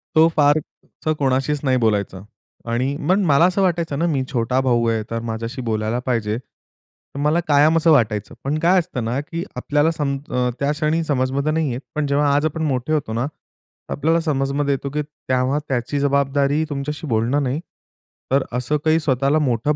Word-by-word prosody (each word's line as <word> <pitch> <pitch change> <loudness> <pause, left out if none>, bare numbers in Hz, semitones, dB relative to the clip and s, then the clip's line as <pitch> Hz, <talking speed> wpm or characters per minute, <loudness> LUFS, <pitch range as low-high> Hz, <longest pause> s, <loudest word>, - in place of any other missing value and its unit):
तो 160 +1 +7
फार 145 0 +4 0.4
असा 155 - -1
कोणाशीच 135 +2 +1
नाही 130 -2 +2
बोलायचा 105 -5 0 0.5
आणि 130 +4 0
मग 190 - +5
मला 150 +1 +5
असं 185 +2 +1
वाटायचं 170 -6 0
ना, 170 - +2
मी 145 -6 0
छोटा 125 +1 0
भाऊ 120 -3 +2
आहे, 110 -1 0
तर 115 - -1
माझ्याशी 115 +4 -4
बोलायला 110 +2 -1
पाहिजे. 115 -3 0
तर 130 +2 -16
मला 150 +4 +2
कायम 150 +2 +5
असं 165 0 +4
वाटायचं, 110 -8 +1
पण 145 +3 -1
काय 180 +3 +4
असतं 160 -9 -4
ना, 120 +4 -1
की 165 +3 -5
आपल्याला 145 +5 +1
सम 140 -4 -1
अ, 125 0 0
त्या 140 +1 +1
क्षणी 155 +2 0
समजमध्ये 140 +1 0
नाही 155 -4 0
येत, 125 +3 -4
पण 150 -1 0
जेव्हा 145 0 +2
आज 145 +2 +2
आपण 160 +1 -2
मोठे 130 +3 -1
होतो 140 -7 -1
ना, 120 +3 0
तर 150 - -13
आपल्याला 165 +3 +1
समजमध्ये, 140 -2 0
येतो 140 +1 -3
की 150 - 0
तेव्हा 135 -1 -1
त्याची 130 +2 -1
जबाबदारी 140 +1 +1
तुमच्याशी 150 +2 -4
बोलणं 120 +5 +1
नाही, 135 +4 -1 0.7
तर 135 0 +3
असं 125 +5 0
काही 160 +1 +4
स्वतःला 140 0 +1
मोठं 125 +4 +1
140 Hz, 185 wpm, -21 LUFS, 125-150 Hz, 0.7 s, तो